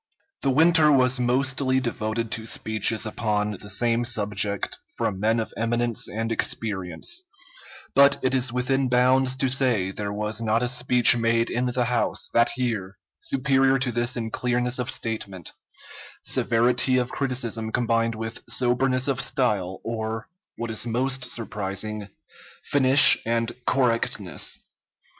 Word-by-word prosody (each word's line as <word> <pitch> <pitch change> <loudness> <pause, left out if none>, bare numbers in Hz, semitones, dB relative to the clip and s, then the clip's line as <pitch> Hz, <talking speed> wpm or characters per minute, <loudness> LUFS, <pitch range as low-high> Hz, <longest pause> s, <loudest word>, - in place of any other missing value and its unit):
The - - +1
winter 160 +2 +4
was 130 -2 +3
mostly 130 +1 +1
devoted 115 -2 -3
to 115 0 -3
speeches 110 0 +1
upon 105 -1 -1
the 100 0 -9
same 115 +4 +1
subject 105 -4 0 0.2
from 95 - -2
men 110 +3 +1
of 110 - -5
eminence 120 0 -1
and 115 +2 -4
experience, 110 - -2 0.7
but 140 0 +6
it 130 - +1
is 130 -1 +1
within 130 +2 0
bounds 130 +1 +3
to 130 0 0
say 125 -8 +1
there 100 +1 -5
was 105 +2 -3
not 115 +1 0
a - - 0
speech 125 -1 +4
made 115 0 0
in 125 +1 -1
the 125 0 0
House, 120 0 -1
that 120 +3 +2
year, 105 -6 -3 0.2
superior 135 0 +1
to 130 -1 -1
this 120 +2 -1
in 115 -1 -4
clearness 125 +1 -1
of 125 +1 -3
statement, 100 -8 -4 0.7
severity 125 +2 +2
of 125 0 -1
criticism 120 -5 -2
combined 115 -1 0
with 115 +2 -6
soberness 130 +2 +1
of 135 -1 0
style, 105 -8 -1
or, 110 0 -4 0.3
what 115 0 -4
is 110 +2 -1
most 130 +3 -2
surprising, 105 -1 -4 0.6
finish 135 0 +6
and 115 0 -1 0.2
correctness. 125 -3 -1
120 Hz, 140 wpm, -24 LUFS, 110-130 Hz, 0.7 s, but